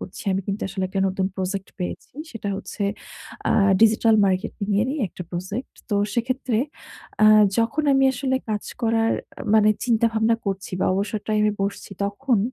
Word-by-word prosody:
করছি। 185 - -8
আমি 190 - 0
কিন্তু 200 +1 -3
আসলে 190 0 -3
একটা 195 +1 -2
নতুন 190 0 -1
প্রজেক্ট 190 0 -3
পেয়েছি। 180 - -5 0.2
সেটা 225 -3 -5
হচ্ছে 205 +1 -6 0.7
আ - - +4 0.3
ডিজিটাল 225 0 +5
মার্কেটিংয়েরই 205 +5 0
একটা 180 - -8
প্রজেক্ট। 190 +8 -5 0.2
তো - - +1 0.2
সেক্ষেত্রে 250 -1 0 0.7
আ - - +8 0.3
যখন 230 +7 +1
আমি 270 0 +4
আসলে 260 0 0
কাজ 210 -1 -2 0.2
করার 225 0 +2 0.3
আ - - -4
মানে 215 -1 +6
চিন্তা 230 -2 +3
ভাবনা 220 +1 +3
করছি 195 -1 -3
বা, - - +2
অবসর 205 +2 -1
টাইমে 215 0 +3
বসছি, 200 0 -4
তখন 225 +4 0
215 Hz, 160 wpm, -23 LUFS, 195-230 Hz, 0.7 s, আ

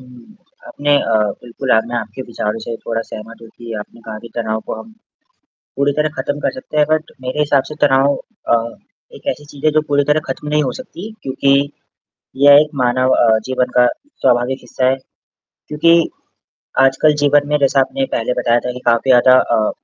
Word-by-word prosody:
हुँ, 125 - -16 0.3
आपने 145 0 0
अ, 115 - 0 0.3
बिल्कुल 125 +2 -5
अब 110 - +2
मैं 120 - -3
आपके 110 +3 -5
विचारों 110 0 -2
से 115 - -4
थोड़ा 115 -1 -1
सहमत 115 +2 -9
हूँ 115 - -12
कि 120 -1 -8
आपने 105 +2 -10
कहा 110 -1 -8
कि 115 - -11
तनाव 110 -1 -2
को - - -3
हम 225 - -13 0.9
पूरी 140 +1 +2
तरह 150 0 +2
ख़त्म 145 +1 -2
कर - - -1
सकते 260 - -8
हैं 150 - +5
बट 155 0 0
मेरे 130 +4 -4
हिसाब 145 -2 +2
से 150 - -7
तनाव 135 +1 +3
अ, 120 - -3 0.6
एक - - -14
ऐसी 150 - -9
चीज़ 145 -1 -10
है 155 - +5
जो 155 +1 +2
पूरी 145 0 +2
तरह 150 +2 +2
ख़त्म 135 +3 -5
नहीं 150 0 +2
हो 130 - -1
सकती 220 -4 -9
क्योंकि 135 +1 +1 0.9
ये 145 - +9
एक 150 - 0
मानव 130 +1 +2
अ, 110 -2 +4
जीवन 130 -1 0
का 125 0 +6 0.3
स्वाभाविक 125 +1 +2
हिस्सा 130 - -2
है 135 - +1 0.7
क्योंकि 165 +2 +3 0.7
आजकल 135 +3 +4
जीवन 145 0 +4
में 150 - +2
जैसा 135 -1 +3
आपने 270 - 0
पहले 115 +2 -1
बताया 120 0 +2
था 125 - -2
कि 125 - -8
काफ़ी 115 +2 +2
ज़्यादा 130 +1 +6 0.2
अ, 110 -1 +1
130 Hz, 195 wpm, -17 LUFS, 120-150 Hz, 0.9 s, ये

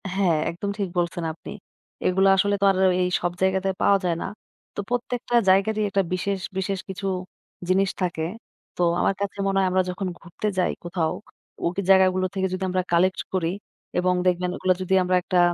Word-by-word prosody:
হ্যাঁ, 185 -5 +3
একদম 180 +4 -4
ঠিক 195 -2 -1
বলছেন 175 0 -1
আপনি। 165 - -10 0.6
এগুলো 190 +1 +3
আসলে 200 +1 +2
তো - - +4
আর 190 - -2 0.3
এই 180 - +1
সব 175 - 0
জায়গাতে 190 0 +2
পাওয়া 200 - +5
যায় 175 -2 +1
না। - - -3 0.5
তো - - -5
প্রত্যেকটা 245 0 -2
জায়গারই 200 +3 +3
একটা 195 0 +2
বিশেষ, 195 +2 -1 0.2
বিশেষ 190 0 -1
কিছু 190 +1 -4 0.6
জিনিস 190 +1 +3
থাকে। 170 -3 -1 0.5
তো - - -3 0.2
আমার - - +2
কাছে 200 0 -3
মনে 195 0 +1
হয় 190 - +3
আমরা 185 0 +3
যখন 185 +1 -3
ঘুরতে 175 +5 -5
যাই 180 - +2
কোথাও, 170 -2 -1 0.5
ওই 175 +3 0
জায়গাগুলো 185 -1 +5
থেকে 190 -1 0
যদি 185 +1 -3
আমরা 185 0 0
কালেক্ট 185 +2 +3
করি, 175 -3 +1 0.5
এবং 180 0 +2
দেখবেন 180 0 +1
ওগুলা 185 - +2
যদি 185 +1 -1
আমরা 180 0 +1
একটা 180 0 +1
185 Hz, 180 wpm, -24 LUFS, 180-195 Hz, 0.6 s, পাওয়া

